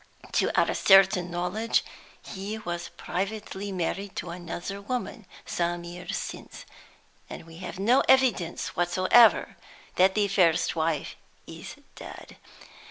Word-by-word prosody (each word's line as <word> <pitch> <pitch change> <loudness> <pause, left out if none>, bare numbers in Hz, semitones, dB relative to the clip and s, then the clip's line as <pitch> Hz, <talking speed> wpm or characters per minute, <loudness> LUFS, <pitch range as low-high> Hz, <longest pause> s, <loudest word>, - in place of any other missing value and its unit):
To - - +1
our - - +2
certain 190 -2 +5
knowledge, 180 +6 -1 0.4
he 200 +2 -6
was 175 -4 -5
privately 200 +1 -4
married 190 +2 -3
to 175 - -5
another 175 +3 -6
woman 230 -2 -5 0.2
some 175 0 -2
years 175 +1 -6
since; - - -8 0.6
and - - -9
we 165 0 -13
have 185 +1 -7
no 235 +7 +3
evidence 245 -10 +2
whatever 185 +6 +4 0.4
that 190 +1 +4
the 210 -1 +2
first 180 -5 +2
wife 160 -2 -1 0.3
is - - -10 0.2
dead. - - -11
185 Hz, 120 wpm, -27 LUFS, 175-205 Hz, 0.6 s, certain